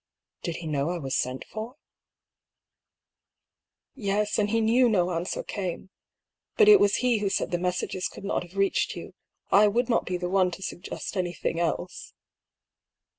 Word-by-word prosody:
" - - -63
Did 170 -3 -2
he 170 - -7
know 145 -1 -1
I 175 - -2
was 135 -5 -3
sent 130 +1 -2
for?" 220 +4 -7 1.5
" - - -64 0.6
Yes; 210 -4 0
and 205 -1 +1
he 225 +2 +2
knew 235 +3 +4
no 180 -4 +2
answer 170 +2 -2
came. 185 -1 -5 0.7
But 430 - +6
it 420 -1 +9
was 200 - +4
he 240 -3 +3
who 205 -1 0
said - - -1
the 175 - 0
messages 180 +1 -1
could - - -11
not 200 - -1
have 175 +2 -11
reached 195 0 +1
you. - - -8 0.4
I 210 +1 +7
would 235 +4 +1
not 235 - +1
be 180 - -1
the 180 0 -3
one 185 0 +3
to 190 - -10
suggest 185 +2 -6
anything 175 -2 -2
else." 175 +1 -3
190 Hz, 180 wpm, -27 LUFS, 175-210 Hz, 1.5 s, it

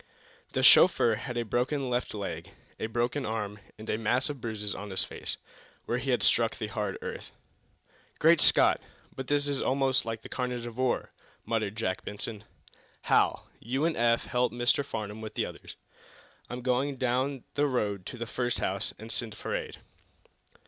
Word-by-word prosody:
The - - +1
chauffeur 115 - +7
had 120 +3 -4
a 120 - 0
broken 130 +5 0
left 125 -2 -1
leg, 100 -2 -4 0.3
a - - -1
broken 120 +5 0
arm, 105 -3 -3 0.2
and 110 +1 -10
a 110 - 0
mass 120 +6 +2
of 140 -4 -9
bruises 105 -3 -3
on 100 +1 -6
his 95 - +2
face, - - -5 0.5
where 120 - 0
he 135 +2 -4
had 125 - +2
struck 115 -1 +3
the 110 - -3
hard 105 -3 -2
earth. - - -6 0.9
"Great 165 0 +5
Scott, - - +5 0.3
but 130 -1 -5
this 145 0 +2
is 140 -2 0
almost 135 0 +2
like 115 0 -4
the - - -7
carnage 125 -2 -3
of 120 -2 -7
war!" 130 -1 0 0.3
muttered 110 -3 -1
Jack 95 -4 -1
Benson. 105 0 -5 0.6
"Hal, - - +3
you 130 +6 -1
and 165 - +1
Eph 115 0 +3
help 125 0 +1
Mr. 120 +3 +2
Farnum 110 -5 -5
with 110 -1 -7
the - - +1
others. - - -9 0.7
I'm 125 0 -5
going 130 +2 +1
down 130 +1 0
the 145 0 +2
road 105 -8 -1
to 125 - -7
the 120 - -3
first 120 +1 -1
house, 95 +1 -1
and 110 +1 -8
send 110 -5 0
for - - -3
aid." - - -4
120 Hz, 180 wpm, -29 LUFS, 110-130 Hz, 0.9 s, chauffeur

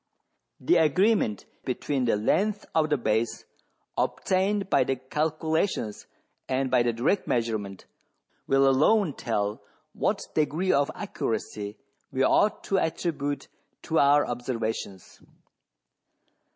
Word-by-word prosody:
The 175 +7 +3
agreement 165 - +2 0.2
between 130 0 -1
thelengthsof 160 - +1
the 150 - +2
base, 115 -1 -1 0.5
obtained 195 +2 0
by - - +3
the 135 - -1
calculations 155 - -2 0.4
and 130 0 0
by 125 -1 +4
the 120 0 +2
direct 125 - 0
measurement, 110 -5 -2 0.6
will 135 0 +4
alone 155 +6 +3
tell 105 -4 -2 0.3
what - - -1
degree 155 +5 +1
of 140 0 +2
accuracy 110 - -4 0.3
we 135 0 +1
ought 210 +9 +3
to 195 - +1
attribute 145 -4 -2 0.4
to 160 -1 +1
our 145 +1 +5
observations." 115 -6 -4
135 Hz, 105 wpm, -27 LUFS, 115-160 Hz, 0.6 s, our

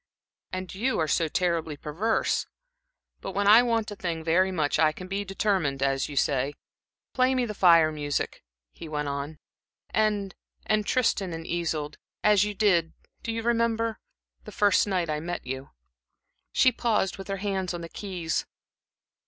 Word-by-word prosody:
"And 185 0 -5
you 245 +7 0
are 160 - +1
so 165 +2 +2
terribly 165 -3 -1
perverse! 185 +11 0 0.7
But 195 - -6
when 200 +1 0
I 215 +4 +8
want 230 -3 0
a - - -5
thing 170 -4 -3
very 185 +4 +3
much, 155 -5 0
I 155 -1 +5
can 180 +4 -9
be 195 +2 -2
determined, 190 -8 0
as 135 0 0
you 145 - -7
say. 140 +1 +1 0.6
Play 255 0 +3
me 250 -1 +1
the 215 - -4
Fire 170 -5 +5
music," 145 -2 -3 0.3
he 160 - -10
went 150 -1 -2
on, 140 +2 -4 0.5
"and 205 -3 +1 0.3
and 215 -1 +1
'Tristan 200 -7 +1
and 165 0 -6
Isolde,' 160 -4 -2 0.2
as 210 -2 +5
you 210 0 -3
did 180 -6 +2 0.3
do 230 - -3
you 225 0 -3
remember? 230 -1 +1 0.4
the - - -10
first 205 -1 +3
night 185 -4 0
I 150 - -1
met 175 +3 -5
you." 130 +1 -5 0.8
She 255 - +5
paused, 215 -6 0
with 195 - -7
her 195 -1 -2
hands 190 -2 -2
on 175 -1 -5
the 165 - -6
keys. 175 -3 -3
185 Hz, 170 wpm, -27 LUFS, 160-210 Hz, 0.8 s, I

